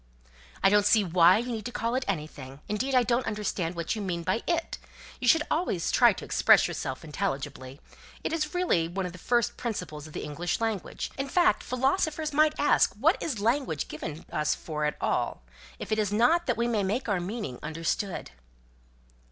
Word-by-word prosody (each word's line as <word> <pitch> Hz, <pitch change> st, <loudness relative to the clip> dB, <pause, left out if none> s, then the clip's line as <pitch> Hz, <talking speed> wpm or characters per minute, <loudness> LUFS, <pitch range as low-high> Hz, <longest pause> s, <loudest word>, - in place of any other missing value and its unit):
"I 195 Hz, -, +6 dB
don't 205 Hz, 0 st, +4 dB
see 215 Hz, 0 st, +5 dB
why 170 Hz, 0 st, +5 dB
you 245 Hz, +2 st, -3 dB
need 220 Hz, -2 st, -4 dB
to 245 Hz, -, -4 dB
call 230 Hz, 0 st, -2 dB
it 255 Hz, +1 st, -1 dB
anything. 150 Hz, -6 st, -5 dB
Indeed, 255 Hz, +6 st, -1 dB
I 250 Hz, -, +5 dB
don't 240 Hz, +1 st, 0 dB
understand 200 Hz, -5 st, -2 dB
what 170 Hz, +3 st, -2 dB
you 215 Hz, -, -4 dB
mean 175 Hz, -4 st, -3 dB
by 185 Hz, +6 st, 0 dB
'it.' 335 Hz, -1 st, -1 dB, 0.4 s
You 250 Hz, -, -2 dB
should 305 Hz, +5 st, +5 dB
always 305 Hz, -, 0 dB
try -, -, +6 dB
to -, -, -7 dB
express -, -, +5 dB
yourself 130 Hz, +3 st, -5 dB
intelligibly. 145 Hz, -5 st, -4 dB, 0.4 s
It -, -, -2 dB, 0.2 s
really 355 Hz, -, +2 dB
is 170 Hz, -, -11 dB
one 190 Hz, 0 st, -2 dB
of 180 Hz, -, -4 dB
the 180 Hz, -, -12 dB
first 240 Hz, +4 st, +1 dB
principles 180 Hz, -10 st, -5 dB
of 155 Hz, -, -13 dB
the -, -, -5 dB
English 165 Hz, +4 st, -2 dB
language. 225 Hz, -4 st, -3 dB
In 275 Hz, 0 st, -2 dB
fact, 360 Hz, +4 st, +3 dB
philosophers 300 Hz, +4 st, 0 dB
might 305 Hz, +1 st, +3 dB
ask -, -, +3 dB
what -, -, +2 dB
is 265 Hz, -10 st, -2 dB
language 230 Hz, -, 0 dB
given 150 Hz, +1 st, -6 dB
us 150 Hz, -1 st, 0 dB
for 150 Hz, -2 st, -4 dB
at 150 Hz, -, -1 dB
all, -, -, -1 dB, 0.3 s
if -, -, -7 dB
it 215 Hz, -, +2 dB
is 205 Hz, -2 st, 0 dB
not 280 Hz, +11 st, +3 dB
that 245 Hz, -, +1 dB
we 235 Hz, 0 st, +1 dB
may 225 Hz, -3 st, +1 dB
make 210 Hz, +7 st, -1 dB
our 200 Hz, -4 st, +1 dB
meaning 175 Hz, -, -5 dB
understood?" 165 Hz, -, -3 dB
205 Hz, 195 wpm, -28 LUFS, 165-245 Hz, 0.4 s, I